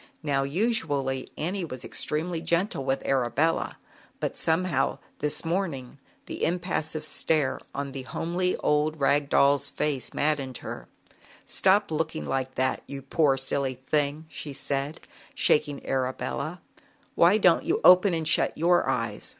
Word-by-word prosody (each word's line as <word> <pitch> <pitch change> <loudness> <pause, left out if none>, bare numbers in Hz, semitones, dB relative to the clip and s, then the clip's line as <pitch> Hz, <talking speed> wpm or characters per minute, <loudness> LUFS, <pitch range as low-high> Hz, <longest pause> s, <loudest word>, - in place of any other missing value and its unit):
Now, 140 -2 +1
usually, 140 - -1
Annie 180 +5 -2
was 130 -6 -7
extremely 160 +2 -2
gentle 170 -2 0
with 135 0 -1
Arabella, 135 +5 +1 0.4
but - - -2
somehow, 160 -4 +1 0.2
this 150 +2 -2
morning, 160 -7 -3 0.3
the - - -6
impassive 165 -3 -1
stare 155 -3 +1 0.2
on 140 0 -3
the 135 - -6
homely 175 +8 -1
old 150 +1 +1
rag 140 +1 +2
doll's 140 0 +3
face 145 -4 -1
maddened 140 -4 -1
her. - - -8 0.6
"Stop 195 0 +2
looking 160 0 -2
like 130 -1 -2
that, 130 0 0
you 140 -1 -7
poor 140 0 +2
silly 135 0 -1
thing!" 145 +4 -1
she 150 -2 -7
said, 140 +2 -3 0.3
shaking 150 -2 +2
Arabella. 135 +5 -2 0.5
"Why 175 +5 +5
don't 180 -5 +4
you 370 +6 0
open 185 0 +7
and 160 -1 -2
shut 160 - +2
your 175 +2 +3
eyes? - - -2
150 Hz, 135 wpm, -27 LUFS, 135-170 Hz, 0.6 s, open